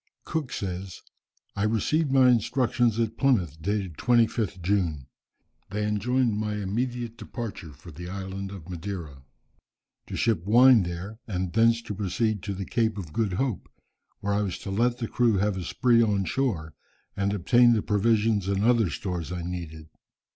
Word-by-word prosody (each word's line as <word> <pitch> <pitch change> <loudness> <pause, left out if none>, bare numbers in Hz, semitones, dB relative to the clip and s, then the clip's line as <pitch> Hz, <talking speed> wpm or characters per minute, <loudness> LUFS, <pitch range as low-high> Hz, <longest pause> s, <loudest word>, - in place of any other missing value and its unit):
Cook 155 -6 -3
says, 95 -1 -5 0.6
"I 100 - -2
received 115 +8 +1
my 135 -1 +6
instructions 120 -1 +2
at 115 -1 -1
Plymouth 90 - +1
dated 95 -3 -2
25th 115 -5 +2
June. 85 -8 0 0.6
They 105 +1 -2
enjoined 115 +1 +1
my 105 -1 -2
immediate 115 +3 -3
departure 105 -8 -6
for 85 +4 -13
the 85 +3 -8
island 95 0 -5
of 95 -5 -10
Madeira. 85 -6 -6 0.9
To - - -6
ship 110 -8 +1
wine 120 +3 +6
there, 90 +5 -5
and 95 -4 -3
thence 115 +1 +3
to 105 - -5
proceed 105 +1 -1
to 100 +1 -4
the 95 0 -5
Cape 110 -1 0
of 85 -6 -7
Good 110 -5 0
Hope, 120 0 -2 0.5
where 100 0 -1
I 105 - +1
was 95 -4 -2
to 95 - -3
let 120 +4 +1
the 115 - -3
crew 115 -4 +2
have 100 +1 +1
a 95 - -4
spree 120 +6 +3
on 100 -4 +1
shore, 85 - -1 0.4
and 100 0 0
obtain 120 +5 +4
the 110 - 0
provisions 105 -1 +2
and 100 0 0
other 115 -4 +3
stores 90 -4 -4
I 90 -1 -4
needed. 85 -3 -6
105 Hz, 165 wpm, -26 LUFS, 95-115 Hz, 0.9 s, my